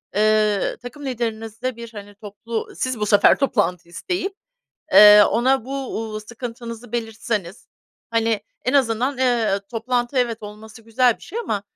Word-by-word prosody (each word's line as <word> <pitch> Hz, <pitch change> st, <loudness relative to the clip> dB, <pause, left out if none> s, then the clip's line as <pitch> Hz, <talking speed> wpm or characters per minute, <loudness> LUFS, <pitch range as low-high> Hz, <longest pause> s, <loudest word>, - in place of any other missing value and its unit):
eee, 215 Hz, -1 st, +2 dB
takım 280 Hz, +4 st, -9 dB
liderinizle 225 Hz, 0 st, -4 dB
bir, 235 Hz, 0 st, -9 dB
hani, 205 Hz, 0 st, -10 dB
toplu 215 Hz, +2 st, -6 dB
siz 255 Hz, -3 st, -3 dB
bu 210 Hz, -, 0 dB
sefer 205 Hz, 0 st, +5 dB
toplantı 180 Hz, -, 0 dB
isteyip, 370 Hz, -, -3 dB, 0.6 s
eee, 210 Hz, 0 st, +10 dB
ona 255 Hz, +1 st, +1 dB
bu, 265 Hz, -4 st, -4 dB
ııı, 215 Hz, -, -5 dB
sıkıntınızı 235 Hz, +1 st, -8 dB
belirtseniz, 225 Hz, -5 st, -4 dB, 0.4 s
hani, 225 Hz, -2 st, +1 dB, 0.2 s
en 255 Hz, -, 0 dB
azından, 255 Hz, 0 st, +1 dB
eee, 235 Hz, -6 st, +1 dB
toplantı, 240 Hz, +2 st, -1 dB
evet, 235 Hz, -2 st, 0 dB
olması 215 Hz, +2 st, -11 dB
güzel 235 Hz, +1 st, +2 dB
bir -, -, -24 dB
şey 450 Hz, -, -6 dB
ama 210 Hz, -, -2 dB
230 Hz, 145 wpm, -21 LUFS, 215-250 Hz, 0.6 s, eee